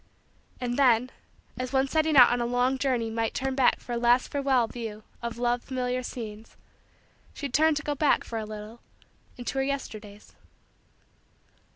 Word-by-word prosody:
And 245 +1 -2
then, 250 -1 +4 0.5
as 255 0 -3
one 270 0 +2
setting 315 0 +2
out 245 -2 +9
on 245 0 0
a - - 0
long 250 +2 +1
journey 245 -5 0
might 225 0 -2
turn 265 0 -1
back 260 -1 +3
for - - -10
a 240 - 0
last 240 +1 +3
farewell 275 -4 +2
view 225 -2 -7 0.2
of 235 -1 -5
loved 240 0 0
familiar 255 -1 -2
scenes, 225 -3 -8 0.8
she 285 - -4
turned 310 +4 +3
to 310 - -4
go 295 - -1
back 290 0 +2
for 225 - -5
a 215 - -4
little 215 +2 -9 0.6
into 245 +2 -3
her - - +2
Yesterdays. 215 -7 -6
245 Hz, 170 wpm, -27 LUFS, 230-270 Hz, 0.8 s, out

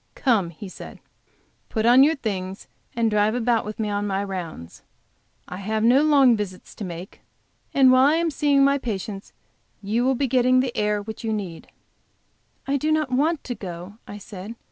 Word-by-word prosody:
"Come," 220 -10 +1
he 170 +5 -10
said, 185 - -11 0.7
"put 220 0 -1
on 245 +3 +7
your 310 +3 +3
things 195 -6 -5 0.3
and 230 -1 +1
drive 210 +1 +2
about 235 -2 +1
with 210 0 -6
me 210 -2 -1
on 205 0 -1
my 195 0 -1
rounds. 170 - -7 0.7
I 180 - -7
have 215 +3 -2
no 250 +5 +5
long 280 -5 +5
visits 200 -4 -6
to - - -8
make, 180 0 -8 0.5
and 265 -2 +5
while 255 +1 +6
I 300 - +3
am 335 0 0
seeing 280 -1 +3
my 280 +1 +3
patients 205 -4 -5 0.5
you 215 +4 -1
will 265 +1 +2
be 275 - 0
getting 255 0 +3
the 255 -2 -1
air, 210 -1 0
which 220 +2 -8
you 225 - -1
need." 190 -6 -5 1.0
"I 275 +1 0
do 305 +3 -1
not 310 -4 0
want 300 +5 +1
to 250 - -4
go," 185 -1 -8
I 205 - -8
said. 205 +1 -9
220 Hz, 190 wpm, -23 LUFS, 200-260 Hz, 1.0 s, on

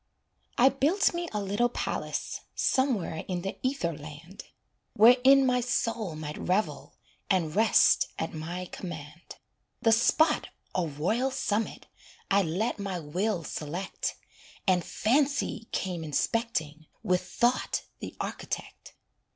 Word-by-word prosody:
I 260 +3 +7
built 310 +11 +2
me 345 0 -3
a 210 - -2
little 205 +5 +1
palace, - - -3
Somewhere 245 - +1
in 180 -2 -3
the 195 - -4
ether 255 - -1
land, 155 +5 -10 0.5
Wherein 255 +5 +7
my 250 -1 +2
soul 230 -6 -1
might 150 -1 -6
revel 190 +4 -1 0.3
And 170 -5 +1
rest 220 +1 +5
at 160 - -3
my 170 +3 -5
command. 160 -2 -8 0.5
The 225 - +5
spot, 300 +7 +3 0.3
a 180 -3 0
royal 185 - 0
summit, 220 -4 -2 0.5
I 200 +1 +5
let 195 +7 -1
my 195 -2 -3
will 175 +4 -1
select, 165 +6 -4 0.5
And 180 -3 +3
Fancy 270 -2 0
came 180 -3 -2
inspecting 160 - -1 0.2
With 180 0 +2
Thought, 245 +1 0 0.2
the - - -7
architect. - - -6
200 Hz, 120 wpm, -28 LUFS, 165-245 Hz, 0.5 s, I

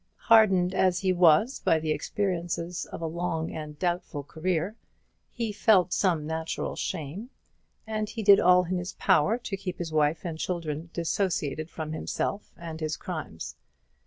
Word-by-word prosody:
Hardened 195 -5 +6
as 185 -1 +2
he 190 -1 +2
was 175 - +4
by 165 - +3
the 155 0 -2
experiences 175 -1 -2
of - - -7
a - - 0
long 165 0 -2
and 150 -1 -7
doubtful 175 -4 -2
career, 170 +6 -2 0.5
he 230 -3 -3
felt 200 -4 +3
some 170 -6 +1
natural 160 +1 -3
shame; 165 - -4 0.6
and 215 -1 -2
he 225 - -5
did 200 -1 +8
all 180 0 +6
in 180 +1 -2
his 175 +1 -5
power 200 +10 +3
to 230 -5 -5
keep 190 -2 -5
his 165 -2 -5
wife 155 +3 +1
and 160 -2 -4
children 165 -2 -3
dissociated 165 -3 -1
from 155 -2 -5
himself 200 +5 -3
and 165 -2 -7
his 155 -1 -2
crimes. 155 - -6
175 Hz, 160 wpm, -27 LUFS, 160-190 Hz, 0.6 s, did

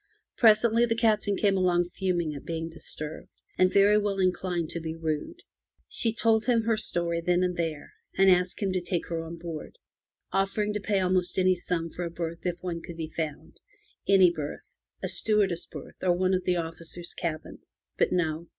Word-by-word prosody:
Presently 230 +1 +5
the 230 - +1
Captain 215 -3 +2
came 200 -2 +2
along 175 -2 +2
fuming 175 -5 -1
at 140 - -8
being 165 0 -4
disturbed, 155 -1 -6 0.3
and 185 0 +3
very 205 +1 +5
well 205 -1 -1
inclined 180 -3 0
to 170 - -3
be 160 0 -5
rude. 165 - -4 0.4
She 230 - -1
told 225 0 +2
him 235 -2 +3
her 225 0 +2
story 170 -5 -1
there 175 +1 +2
and 180 -1 0
then, 160 -3 -3 0.3
and 195 - +5
asked 180 +2 +3
him 195 - +1
to 185 - 0
take 175 -1 -2
her 165 -1 -2
on 165 +1 -7
board, 165 -2 -7 0.5
offering 205 +2 0
to 210 - -1
pay 200 0 0
almost 185 -1 +1
any 185 0 +4
sum 170 -2 -3
for 175 - -5
a 170 - -3
berth 170 0 -5
if 175 - 0
one 170 -2 -3
could 170 -1 -9
be 160 -1 -5
found 155 -3 -5 0.3
— - - -36
any 190 -3 +7
berth, 150 -4 -6 0.4
a - - 0
stewardess 200 -6 +2
berth - - -10
or 180 -1 +3
one 185 +1 +1
of 185 -1 0
the 180 - +2
officers* 165 +1 -5
cabins. 160 -3 -6 0.2
But - - +3
no. 170 -2 -1
180 Hz, 195 wpm, -27 LUFS, 165-200 Hz, 0.5 s, any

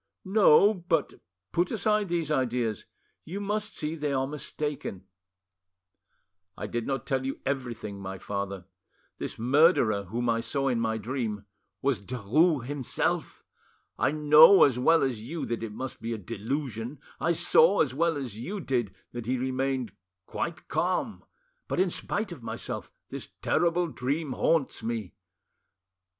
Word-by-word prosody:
"No. 200 0 +6
But 175 -5 -1 0.4
put 175 +1 +1
aside 210 -2 +1
these 165 -3 -1
ideas; 125 -5 0 0.4
you 185 +6 -5
must 210 +1 -2
see 155 +1 -2
they 150 -3 -2
are 135 0 +1
mistaken." 145 -8 -4 1.5
"I 105 - -4
did 115 +2 -3
not 135 -2 -2
tell 135 -3 0 0.2
everything, 120 -7 -3
my 95 0 -5
father: 100 -1 -4 0.5
this - - -4
murderer 120 - +4
whom 120 +6 -2
I 115 -1 +2
saw 135 +3 0
in 120 -3 +1
my 110 -1 0
dream—was 105 -1 -4
Derues 130 - +2
himself! 140 -2 -2 0.6
I - - +3
know 150 +5 +8
as 125 -3 +3
well 165 +6 +4
as 125 -5 -1
you 155 +9 -4
that 120 -1 -3
it 115 -2 -4
must 130 +5 -6
be 115 +1 -3
a - - -3
delusion, 115 - -4 0.2
I 170 - +2
saw 170 +3 +5
as 135 -5 +1
well 165 +2 +1
as 120 -7 -5
you 195 - -4
did 120 - -1 0.2
that 120 -2 -6
he 130 +1 +1
remained 130 -1 -1 0.3
quite 165 -2 -4
calm, 185 +5 -1 0.4
but, - - -2
in 185 -1 +3
spite 205 +2 -2
of 165 -7 -8
myself, - - -5 0.2
this - - -6
terrible 170 +2 +2
dream 140 +2 -2
haunts 145 +2 +1
me 110 -4 -3
135 Hz, 145 wpm, -28 LUFS, 115-160 Hz, 1.5 s, know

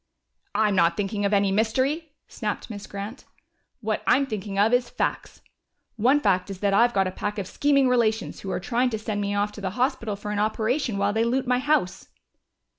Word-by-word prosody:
"I'm 210 -1 +2
not 170 -1 +3
thinking 205 0 -1
of 200 - +1
any 200 -1 +3
mystery," 260 +10 0 0.2
snapped 215 +1 -4
Miss 205 -2 -7
Grant. 200 +5 -7 0.6
"What 215 -1 -1
I'm 275 +2 +4
thinking 205 -5 -5
of 210 +4 +3
is 245 -1 +2
facts. - - -3 0.5
One 250 +6 +3
fact 195 -6 +1
is 195 -2 -6
that 200 -1 +2
I've 240 +3 +4
got 195 -1 +3
a 185 - -2
pack 205 +2 -4
of 200 - -2
scheming 275 +5 +2
relations 230 -3 +1
who 195 - -7
are 185 - -1
trying 245 +5 0
to 220 - -2
send 215 -1 -3
me 200 0 -1
off 205 +1 0
to 205 - -10
the 190 - -1
hospital 250 -4 0
for 210 +1 -6
an 210 - -1
operation 220 +2 0
while 200 +1 +1
they 220 +1 +2
loot 255 +3 0
my 250 0 +2
house." 285 -9 0
215 Hz, 205 wpm, -25 LUFS, 200-245 Hz, 0.6 s, I'm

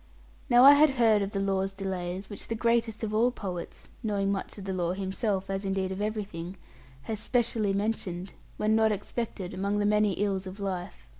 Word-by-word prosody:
Now 245 0 +7
I 280 +2 +11
had 300 +1 +6
heard 230 -5 +3
of 195 - -1
the 200 - -3
law's 195 0 0
delays, 190 -1 -4
which 205 - -7
the 225 - -2
greatest 230 -1 +1
of 215 -1 -2
all 230 +3 +4
great 250 - -11
poets 180 -4 -6
(knowing 200 -2 0
much 195 +1 -4
of 200 - -7
the 190 - -2
law 175 -1 0
himself, 195 +1 -2
as 195 0 -3
indeed 190 -1 -1
of 190 +1 -4
everything) 200 -4 -4 0.5
has 215 +6 -4
specially 225 -2 +1
mentioned, 195 -3 -2 0.2
when 215 +1 +2
not 220 0 +4
expected, 205 -2 -4
among 200 +2 -1
the 205 - +1
many 210 -1 +3
ills 195 -1 -1
of 190 +2 -8
life. 185 -3 -5
200 Hz, 200 wpm, -28 LUFS, 190-220 Hz, 0.5 s, I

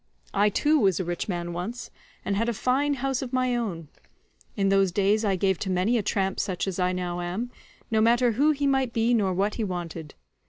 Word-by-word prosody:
I 205 +1 +3
too 300 +8 +2
was 190 - +2
a - - 0
rich 175 +4 -3
man 175 -2 -3
once, 210 +9 -5 0.3
and 200 - 0
had 230 +4 0
a 235 - -2
fine 280 +6 +1
house 270 0 -1
of 255 -3 -5
my 255 -1 +1
own; 185 -10 -3 0.7
in 195 -1 +2
those 195 -1 +3
days 205 +4 +2
I 200 -3 +2
gave 190 -1 +1
to 190 - -3
many 185 +6 +1
a 230 - +2
tramp 195 -1 -1
such 185 0 -2
as 190 -1 -3
I 180 0 +2
now 175 -1 -3
am, 195 +8 -3 0.4
no 220 -1 +3
matter 240 +2 +4
who 280 +8 +3
he 290 -2 +1
might 265 -3 +1
be 230 +1 +2
nor 205 -5 +2
what 200 +3 0
he - - +1
wanted. 170 -5 -5
205 Hz, 225 wpm, -26 LUFS, 185-240 Hz, 0.7 s, matter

